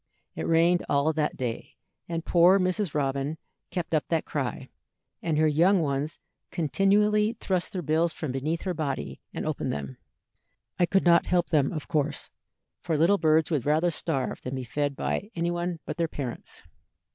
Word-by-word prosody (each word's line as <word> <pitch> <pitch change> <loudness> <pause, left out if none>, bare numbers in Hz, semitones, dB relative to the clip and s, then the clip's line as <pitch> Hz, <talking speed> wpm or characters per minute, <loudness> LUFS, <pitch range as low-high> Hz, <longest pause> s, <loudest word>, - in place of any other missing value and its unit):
It - - -3
rained 170 +2 +4
all 145 +3 +2
that 150 -1 -1
day, 120 -3 -4 0.3
and 165 0 -3
poor 175 +2 +6
Mrs. 185 -2 -1
Robin 140 +1 -1 0.3
kept 170 -3 -4
up 155 - +1
that 165 -2 0
cry, - - -3 0.5
and 160 -3 0
her 155 0 +4
young 175 +6 +4
ones 145 0 -1 0.3
continually 205 +6 +2
thrust 190 -6 -2
their 180 -2 -4
bills 160 +3 +2
from 155 -3 -4
beneath 150 +6 -2
her 185 - -1
body, 145 -5 -4
and - - -4
opened - - -2
them. 70 -2 -5 0.8
I 175 - +4
could 195 +1 +2
not 170 -1 +5
help 175 -1 +1
them, 145 -4 +3
of 155 -4 -5
course, 150 -3 -1 0.5
for 160 -3 -1
little 175 +6 +4
birds 160 0 +3
would 145 -6 +1
rather 160 +4 +3
starve 145 -4 -2
than 130 +1 -4
be 130 - -4
fed 145 +3 -2
by 205 - -2
any 170 0 0
one 175 -1 -2
but - - -5
their 170 -1 +1
parents. 135 -6 -6
160 Hz, 175 wpm, -27 LUFS, 145-175 Hz, 0.8 s, poor